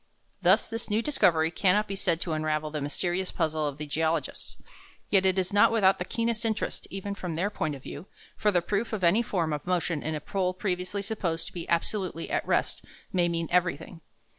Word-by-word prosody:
Thus 185 +4 +5
this 225 0 -4
new 215 +2 +1
discovery 165 - +3
cannot 205 +4 +2
be 195 - -3
said 175 -4 +1
to 170 - -2
unravel 155 -1 -1
the 150 -1 -3
mysterious 175 +6 -1
puzzle 155 -2 0
of 140 -1 -4
the 150 - -5
geologists. 160 +2 -1 0.5
Yet 190 -2 +5
it 190 0 +2
is 190 +2 0
not 205 - +6
without 195 -4 +4
the 180 - -2
keenest 230 +2 -1
interest, 220 -2 -1
even 195 +1 -4
from 180 -5 -5
their 190 +6 0
point 155 -7 -2
of 135 - -12
view; 190 - -8 0.3
for 210 - +2
the 175 -4 +2
proof 210 +5 -1
of 205 -4 -2
any 175 +7 +5
form 170 -9 -1
of 150 +3 -5
motion 175 -4 0
in 155 0 -2
a - - -2
pole 185 +3 -1
previously 185 +1 -2
supposed 185 -6 -2
to - - -10
be 170 -2 -6
absolutely 170 0 -1
at - - -1
rest - - 0 0.3
may 175 -2 +3
mean 165 -1 -1
everything. 175 -1 0
180 Hz, 210 wpm, -28 LUFS, 160-200 Hz, 0.5 s, not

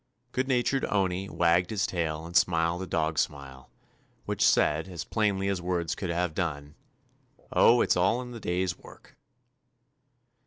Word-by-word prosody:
Good 130 +1 -1
natured 130 +1 +1
Owney 95 -1 0
wagged 85 +1 +2
his 100 -3 0
tail 80 -2 -3
and 85 +1 -10
smiled 85 0 +2
a 95 - -5
dog 80 -2 0
smile, 70 -2 -4 0.6
which - - -1
said, 80 +4 +3
as 90 -3 -6
plainly 100 -3 0
as 95 -2 -1
words 90 -2 -1
could 90 - -5
have 85 -1 -1
done, 75 -4 -3 0.8
*'0h, 120 +1 +5
it - - -2
's - - +4
all 95 +7 +2
in 125 - -9
the 120 - -8
day's 90 -2 -1
work." - - -17
90 Hz, 160 wpm, -28 LUFS, 80-100 Hz, 0.8 s, 0h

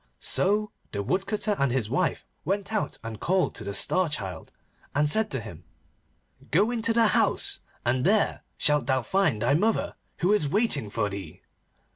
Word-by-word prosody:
So 210 - +1 0.2
the 100 -1 -2
Woodcutter 205 - -1
and 140 -2 +2
his 125 -4 0
wife 150 +10 0 0.2
went 200 +3 -2
out 215 - -1
and 110 -2 -6
called 185 +1 +1
to - - -7
the 100 0 -4
Star 185 -3 +3
Child, 95 - -5 0.4
and 145 +1 +3
said 220 +8 +2
to 135 - -2
him, 100 -7 -10 0.9
'Go 205 +8 +3
into 230 -1 0
the 225 -1 +4
house, - - +1 0.3
and 125 +1 +1
there 205 +4 +2 0.2
shalt 150 -4 +2
thou 130 -2 +1
find 165 - +1
thy 125 +4 +3
mother, 210 +8 +1 0.2
who 180 +4 +2
is 155 -9 +1
waiting 160 - 0
for 105 0 -1
thee. 95 -6 -8
150 Hz, 170 wpm, -27 LUFS, -, 0.9 s, the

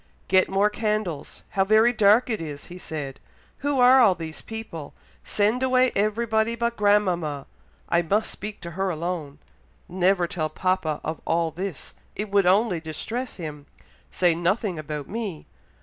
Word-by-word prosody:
"Get 185 0 +4
more 200 +2 +2
candles! 210 -8 -3
how 195 - +2
very 220 +4 +4
dark 215 +2 +5
it 220 -7 -2
is!" 145 -3 -7
he 180 - -9
said. 145 -6 -6 0.4
"Who 285 -1 0
are 250 +2 +7
all 200 -6 +5
those 160 -2 -7
people? 220 -10 -8 0.3
Send 215 +4 +1
away 255 -1 +3
everybody 220 +2 +1
but 235 0 -1
grandmama! 180 -9 +1 0.4
I 170 - +3
must 200 +6 0
speak 210 0 -7
to 170 - -6
her 190 +3 -1
alone. 165 -4 -4 0.5
Never 180 0 +2
tell 160 -2 -2
papa 185 -5 -1
of 160 - -4
all 165 0 0
this, 180 -1 -6 0.2
it 210 0 -4
would 200 -2 +3
only 195 -1 +3
distress 220 - -4
him 150 -4 -7 0.4
say 175 -2 +2
nothing 180 +1 0
about 150 -2 -5
me. 210 -7 -5
190 Hz, 155 wpm, -25 LUFS, 165-215 Hz, 0.5 s, are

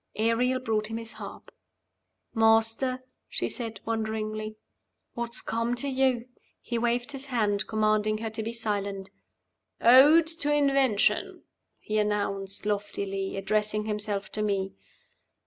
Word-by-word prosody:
Ariel 235 +4 +2
brought 220 -4 -1
him 225 +1 -4
his 230 0 -5
harp. - - -10 0.8
"Master," 225 +3 +3 0.3
she - - 0
said, 225 -5 -4
wonderingly, 215 -1 -3 0.6
"what's 235 0 -3
come 230 +2 -1
to 245 +4 -1
you?" 260 -3 +1 0.3
He 235 -1 -3
waved 240 +2 0
his 275 0 -7
hand, 215 -6 0
commanding 215 0 +1
her 225 0 -4
to 220 - -4
be 225 +1 -3
silent. 200 -4 -3 0.7
"Ode 285 +7 +7
to 320 -2 +3
Invention," 275 -7 +2 0.3
he 215 0 -2
announced, 200 -2 -1
loftily, 200 -2 -2
addressing 210 +1 0
himself 210 -1 -3
to 215 - -3
me. 195 -2 -1
220 Hz, 125 wpm, -27 LUFS, 210-240 Hz, 0.8 s, Ode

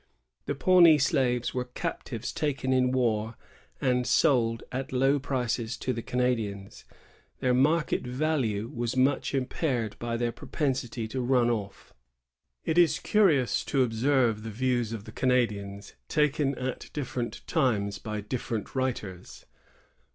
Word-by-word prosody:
The 145 - -1
Pawnee 170 0 +6
slaves 130 -4 +1
were 125 0 -2
captives 125 -1 -5
taken 135 -3 -1
in 125 -1 +3
war 115 -3 0 0.4
and 125 -2 +1
sold 115 -4 +3
at 130 +1 -4
low 135 +2 +3
prices 125 -3 -2
to 130 - -2
the 115 - -4
Canadians. 115 -6 -2 0.5
Their 125 -1 +2
market 150 +6 +2
value 125 -6 0
was 120 +1 -2
much 135 +2 +2
impaired 125 -4 -1
by 115 0 -2
their 120 0 0
proj)cnsity 125 -5 -3
to 130 - -2
run 120 -1 +3
off. 100 -4 -5 0.7
It 160 +2 +2
is 170 -3 +4
curious 160 - +2
to 130 -3 +2
oljscrve 120 -1 +1
the 115 - -6
views 120 0 0
of 110 -3 -5
the 110 - -10
Canadians 105 -6 -1
taken 150 -2 +1
at 130 0 -4
different 125 -4 -4
times 110 - 0
by 105 -1 -4
different 110 0 -4
writers. 115 -9 -4
125 Hz, 135 wpm, -28 LUFS, 115-135 Hz, 0.7 s, Pawnee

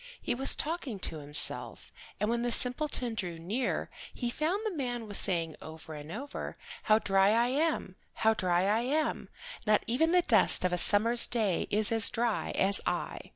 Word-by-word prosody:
He - - -2
was 265 +3 -1
talking 300 - -3
to 160 - -3
himself, 145 +1 +2 0.3
and 210 - 0
when 235 +1 0
the 240 0 -1
simpleton 250 0 0
drew 180 -6 -4
near 205 +11 -3 0.2
he 240 -2 -4
found 350 - -2
the 430 - -2
man 245 -5 -3
was 205 - -2
saying 165 -5 -2
over 160 0 -10
and 150 +1 -9
over, 280 +9 -6 0.3
"How 215 -1 +5
dry 195 -2 +3
I 235 +3 +2
am! 285 - -1 0.2
How 220 0 +3
dry 180 -4 +1
I 210 +3 +2
am! 300 +5 -1 0.4
Not 210 0 +3
even 300 +8 +1
the 360 0 +4
dust 185 - +3
of 180 - 0
a - - +1
summer's 230 +6 +4
day 215 -7 -1
is 210 +1 0
as 225 -1 +4
dry 235 -2 -1
as 195 +1 +3
I." - - -2
225 Hz, 185 wpm, -30 LUFS, 190-255 Hz, 0.4 s, How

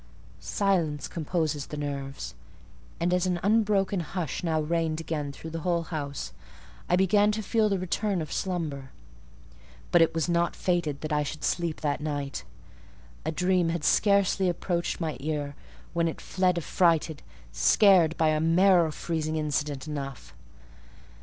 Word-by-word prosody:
Silence 170 -7 0
composes 155 -3 -2
the 150 - -6
nerves; 140 -2 -5 0.7
and 175 +1 +1
as 180 0 +2
an 180 -1 0
unbroken 205 -2 +2
hush 175 0 -4
now 160 -2 +1
reigned 160 0 0
again 150 -3 -3
through 160 +3 -9
the 165 - -4
whole 170 0 0
house, 145 -4 -5 0.6
I 180 - +4
began 205 +3 +4
to 220 0 -3
feel 215 +1 +2
the 195 - +1
return 185 +2 -1
of 155 -2 -5
slumber. 155 -8 -3 1.0
But 175 - +6
it 165 - +3
was 165 0 +1
not 170 0 +1
fated 170 -6 -1
that 155 0 -3
I 150 - +2
should 150 +1 -5
sleep 170 -3 -1
that 145 -1 -1
night. 145 -2 -3 0.8
A 160 - 0
dream 180 +1 +2
had 165 -2 -2
scarcely 200 -1 +3
approached 175 0 -2
my 160 -3 -2
ear, 145 -1 -3 0.4
when 170 0 +1
it 160 - -4
fled 185 -2 +1
affrighted, 165 -2 +1 0.3
scared 180 - +5
by 160 -1 +3
a 155 0 +2
marrow 170 +1 +4
freezing 160 0 -2
incident 150 -2 -2
enough. 140 -3 -6
165 Hz, 150 wpm, -27 LUFS, 150-180 Hz, 1.0 s, But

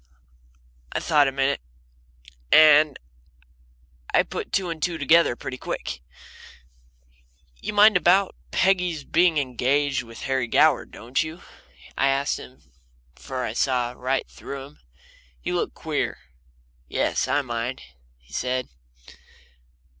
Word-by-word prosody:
I - - -1
thought 145 -2 +3
a - - 0
minute, 135 +1 0 0.9
and 155 -2 +7 1.3
put - - -5
two 185 -3 0
and 160 -1 -7
two 175 0 -1
together 155 -2 +4
pretty 130 +1 -7
quick. 60 0 -5 1.6
"You - - -4
mind 210 0 +6
about 180 +2 +3
Peggy's 180 -5 +1
being 170 +3 +2
engaged 135 +1 0
to 120 -2 -7
Harry 130 +1 -2
Goward, 150 +3 +3
don't 120 +3 -2
you?" 160 +2 -6 0.5
I 135 - +2
asked 135 +1 0
him; 130 - -13 0.5
for 125 - -5
I - - -4
saw 125 -1 0
right 130 +2 -2
through 140 -1 -8
him 145 - -15
then. - - -30 0.6
He - - -4
looked - - -2
queer. - - -2 0.7
"Yes, - - 0
I 145 - +1
mind," 120 0 -4 0.3
he 60 +3 -22
said. 125 - -2
140 Hz, 125 wpm, -24 LUFS, 125-160 Hz, 1.6 s, and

